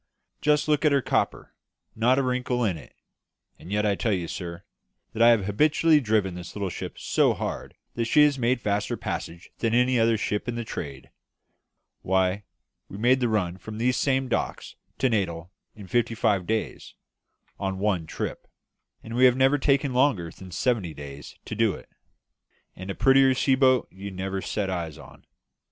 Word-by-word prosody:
just 150 0 +2
look 150 0 +2
at 150 - +4
her 140 - +4
copper 130 - -1 0.4
not 120 +4 +3
a 140 - +2
wrinkle 125 -1 -1
in 95 -5 0
it; 80 - -13 0.6
and 90 - -11
yet 105 +1 +1
I 105 - +3
tell 110 +3 -1
you, 90 -3 -2
sir, 85 +1 -6 0.5
that 110 - -3
I 115 - +8
have 115 -5 +3
habitually 150 +8 +3
driven 105 -7 0
this 90 -1 -9
little 100 -3 -3
ship - - -7
so - - +2
hard - - -5 0.2
that 115 - -1
she 150 +6 +5
has 145 -2 +2
made 120 +1 +1
faster 105 -1 -1
passages 85 +2 -6
than 115 0 +1
any 125 0 +3
other 115 0 +3
ship 105 +1 -2
in 120 - -2
the 120 - -3
trade. 70 - -7 0.9
Why, 95 +1 0 0.4
we 100 - -8
made 125 +4 +3
the 120 -2 +1
run 95 -5 -1
from 110 +3 -8
these 125 +2 +1
same 135 -1 +1
docks 125 - -3 0.2
to 130 - +2
Natal 90 -6 -2 0.2
in 105 - -10
fifty 115 +3 0
five 105 -5 +1
days, 110 0 -3 0.6
on 95 -1 -2
one 95 -5 0
trip; - - -5 0.6
and 115 - -8
we 125 +2 +4
have 125 0 +5
never 135 +2 +3
taken 140 -1 +1
longer 125 - +2
than 95 - -12
seventy 90 -2 -1
days 70 0 -10
to - - -6
do 110 -2 +2
it. - - -13 0.9
And 95 +1 -8
a 95 - -3
prettier 135 0 +5
sea 135 +1 +2
boat 130 -2 +3
you 100 +2 -8
never 95 0 -4
set 105 0 -2
eyes 85 -5 -4
on. - - -15
110 Hz, 185 wpm, -26 LUFS, 95-130 Hz, 0.9 s, I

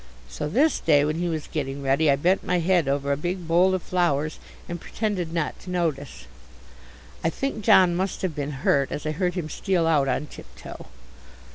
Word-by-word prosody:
So 150 - -5
this 290 - +2
day 145 -3 +3
when 155 +1 -1
he 175 0 -1
was 155 -2 -3
getting 140 -2 -4
ready 140 +3 +2
I 140 - +5
bent 180 +7 +1
my 180 - 0
head 175 -2 +2
over 140 0 0
a - - +2
big 175 +3 -4
bowl 180 +3 +4
of 185 - -4
flowers 155 -4 0 0.3
and 175 -1 -6
pretended 195 -7 -3
not 165 -3 -2
to 185 - -11
notice. 155 - -3 1.0
I 165 - +2
think 225 +2 -4
John 180 -3 +5
must 190 +2 -2
have 185 -4 -1
been 145 -2 -5
hurt, 140 -1 +2
as 150 - -5
I 155 - 0
heard 180 +2 -1
him 175 -4 -3
steal 175 +1 0
out 150 -4 +3
on 135 - -1
tiptoe. - - -11
165 Hz, 200 wpm, -24 LUFS, 145-180 Hz, 1.0 s, I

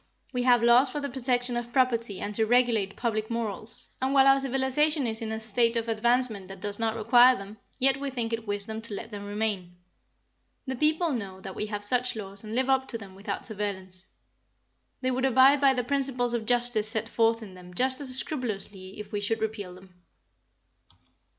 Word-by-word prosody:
We 250 - 0
have 245 -2 +4
laws 240 +3 +6
for 295 - -4
the 280 -2 -4
protection 245 -1 0
of 240 0 -4
property 235 -6 +1
and 205 - -4
to 220 +1 0
regulate 230 -5 +2
public 220 -2 -2
morals, 225 -1 -3
and 265 +1 0
while 270 -1 +6
our 270 0 +6
civilization 270 +3 +1
is 225 0 -2
in 220 -1 -4
a 220 - -3
state 230 +2 +1
of 230 0 -2
advancement 230 -2 0
that 195 0 -10
does 205 +2 -4
not 225 -1 0
require 240 +3 +5
them, 200 +2 -10 0.2
yet 270 0 +3
we 280 0 -3
think 235 -3 -3
it 225 -1 -4
wisdom 205 +2 -3
to 225 -2 -5
let 225 +3 -7
them 205 -1 -7
remain. 205 -4 -3 0.9
The 265 -1 -3
people 315 +5 +1
know 200 -7 -5
that 190 - -7
we 210 - -3
have 205 -1 -4
such 250 +4 +2
laws 200 -1 -6
and 215 +1 -6
live 260 +1 +1
up 265 0 +2
to 230 - -2
them 200 -4 -11
without 200 +1 -5
surveillance. 190 -3 -4 0.9
They 255 0 0
would 255 +1 -1
abide 265 +2 +5
by 270 -1 +5
the 250 - 0
principles 255 -2 0
of 225 -2 -2
justice 240 -3 +2
set 220 -1 +1
forth 230 0 +1
in 195 -3 -11
them 180 -1 -13
just 260 +5 +1
as 275 - -4
scrupulously 205 -9 -5
if 210 0 -8
we 205 -1 -2
should 225 +2 -1
repeal 210 -4 -4
them. 185 0 -16
230 Hz, 200 wpm, -27 LUFS, 205-255 Hz, 0.9 s, laws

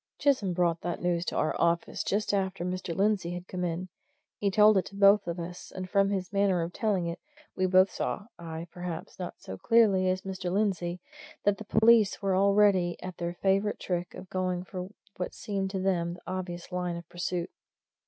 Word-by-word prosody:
Chisholm 255 -10 +2
brought 170 -1 +1
that 175 0 -3
news 175 -1 0
to - - -3
our 155 - +1
office, 170 0 +1
just 205 +1 0
after 190 -2 -1
Mr. 180 -2 -3
Lindsey 190 -3 +1
had 180 +1 -7
come 180 -1 -4
in. 175 +1 -2 0.5
He 200 - +1
told 210 +2 +6
it - - -3
to 200 - -10
both 200 0 +5
of 170 +1 -3
us; 175 +1 -7
and 185 0 -6
from 195 +1 +3
his 190 -1 -3
manner 195 -3 +2
of 170 +1 -5
telling 200 -6 0
it, 170 0 -4 0.4
we 185 0 +1
both 185 +1 +5
saw 205 - -3
I, 165 -1 -6
perhaps, 175 0 -6
not 180 - -5
so 95 0 -9
clearly 200 -5 +4
as 185 0 -1
Mr. 190 -2 -4
Lindsey 180 -3 0 0.4
that 205 -1 +2
the 215 - -7
police 220 -1 +4
were 195 -2 +1
already 195 -2 +3
at 185 -1 -6
their 175 0 -3
favourite 195 +2 +2
trick 175 -1 -3
of 185 - -9
going 185 -1 -1
for 185 0 -6 0.3
what 180 - -4
seemed 195 -2 -2
to 190 0 -3
them 175 -2 0
the 180 - -15
obvious 180 -1 -5
line 180 -1 -2
of 170 -1 -8
pursuit. 175 0 -3
185 Hz, 200 wpm, -29 LUFS, 175-200 Hz, 0.5 s, told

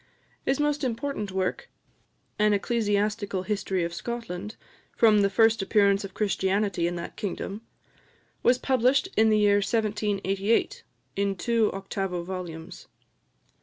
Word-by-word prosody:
His 270 +1 +1
most 295 0 0
important 245 -4 -2
work, 190 0 -2 0.7
"An 210 0 +4
Ecclesiastical 205 -2 0
History 195 -2 -1
of 170 0 -3
Scotland, 210 -1 -5 0.4
from 215 -3 +5
the 200 - +3
first 225 +1 +3
appearance 200 0 +3
of 195 -1 -8
Christianity 195 -3 0
in 175 - -3
that 170 0 -6
kingdom," 200 +1 -4 0.8
was 245 +1 +4
published 260 +1 +2
in 220 +1 +4
the 215 - +4
year 205 -1 +4
1788, 205 -1 0 0.3
in 200 0 0
two 230 +1 +1
octavo 195 -2 -3
volumes. 175 -3 -7
205 Hz, 125 wpm, -26 LUFS, 195-225 Hz, 0.8 s, from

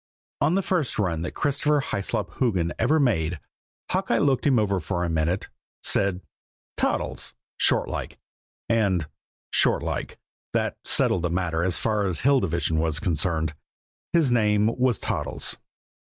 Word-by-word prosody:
On 170 - +2
the 195 - +1
first 175 -9 0
run 90 -6 0
that 85 - -4
Christopher 150 +1 +1
Hyslop 100 -7 -2
Hoogan 95 -10 +1
ever 145 +8 +3
made, 90 - +1 0.5
Hawkeye - - +1
looked 140 0 +2
him 135 -3 +4
over 100 -3 +1
for 90 -1 -2
a 85 - -1
minute, 80 +4 0 0.4
said, 95 -2 +2 0.5
"Toddles," - - -2 0.2
shortlike - - 0 0.5
and, 100 -8 +2 0.5
shortlike, - - +1 0.4
that - - 0
settled 90 - +2
the 85 - 0
matter 85 0 0
so 90 - -1
far 105 -3 +1
as 90 -4 -2
the - - -6
Hill 140 +1 +5
Division 85 -4 0
was 80 -1 +1
concerned. 80 -3 0 0.6
His 160 -7 +3
name 105 -2 +3
was 125 -4 +2
Toddles. - - -2
100 Hz, 140 wpm, -25 LUFS, 85-125 Hz, 0.6 s, Hill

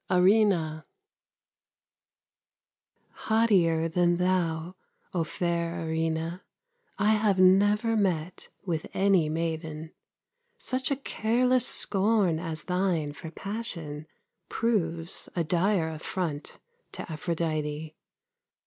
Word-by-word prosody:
ERINNA 180 -4 +3 2.4
Haughtier 185 -8 +3
than 175 +1 +2
thou, 180 -1 0 0.4
O 170 -3 +1
fair 170 0 -2
Erinna, 160 +2 -2 0.6
I 210 +2 +3
have 210 -3 +2
never 205 +4 +4
met 180 -4 -1 0.2
with 165 -4 -2
any 190 -5 +3
maiden. 160 -1 -4 0.6
Such 260 0 -1
a 280 - +1
careless 250 -1 +1
scorn 195 -4 +2
as 160 -2 -4
thine 180 -5 0
for 160 - -8
passion 165 -7 -5 0.4
Proves 170 -7 -1
a 170 - +1
dire 175 +1 +1
affront 160 -1 -4 0.4
to - - -6
Aphrodite. 155 -2 -3
175 Hz, 90 wpm, -28 LUFS, 160-200 Hz, 2.4 s, never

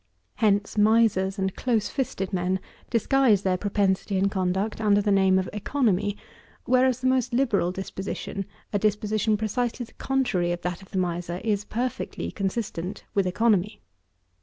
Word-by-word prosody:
Hence 205 -1 +1
misers 210 -3 +3
and 190 -1 -1
close 230 -5 0
fisted 205 -9 -3
men 185 +1 0 0.3
disguise 235 -3 +3
their 185 -1 +2
propensity 195 0 0
and 195 +1 +2
conduct 190 +3 -1
under 205 -1 +4
the 205 0 +1
name 190 -1 +4
of 185 -1 0
economy; 210 -3 0 0.5
whereas 255 0 +3
the - - -4
most 255 -1 +2
liberal 225 -9 +2
disposition, 190 +1 -5 0.3
a 205 - +2
disposition 215 +1 +1
precisely 235 +3 -1
the - - -21
contrary 230 -10 0
of 175 0 -3
that 180 +1 -3
of 190 - -15
the - - -4
miser, 175 -1 -2
is 210 -2 0
perfectly 245 +3 -3
consistent 195 -2 -3
with 195 -2 +2
economy. 210 0 +1
205 Hz, 150 wpm, -26 LUFS, 190-225 Hz, 0.5 s, under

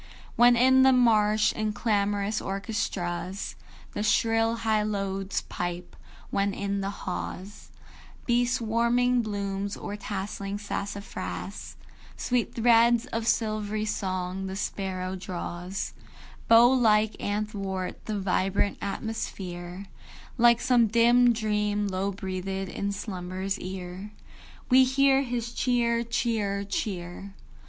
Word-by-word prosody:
When 240 +1 +6
in 260 +2 +5
the 265 0 +6
marsh, 215 -3 +4
in 215 -1 -2
clamorous 205 -1 0
orchestras, 190 -2 -3 0.4
The - - -3
shrill 225 +1 +2
hylodes 205 -3 -1
pipe; 175 0 -5 0.4
when, 200 0 0
in 200 0 -2
the 195 - -2
haw's 195 0 -6 0.6
Bee 240 0 +3
swarming 240 +1 +2
blooms, 200 -2 -3
or 205 - -5
tasseling 200 -1 -4
sassafras, 205 0 -5 0.4
Sweet 245 -2 -1
threads 235 0 +4
of 225 0 -2
silvery 215 -2 0
song 185 -2 -3
the 190 - -5
sparrow 190 -2 -3
draws, 180 0 -5 0.5
Bow 230 +1 +8
like, 220 -4 +3
athwart 200 -3 -3
the 215 -1 -2
vibrant 195 +1 0
atmosphere, 190 -3 -5 0.5
Like 235 -1 +5
some 245 -3 +4
dim 240 +2 +5
dream 210 -2 0
low 195 +1 -1
breathed 190 0 -4
in 200 +2 -3
slumber's 190 -1 -4
ear, 185 +2 -7 0.5
We 260 0 +7
hear 270 +1 +4
his 240 -3 -3
"Cheer, 235 -2 +1
cheer, 220 -4 -1
cheer." 195 -1 -4
205 Hz, 110 wpm, -27 LUFS, 195-230 Hz, 0.6 s, Bow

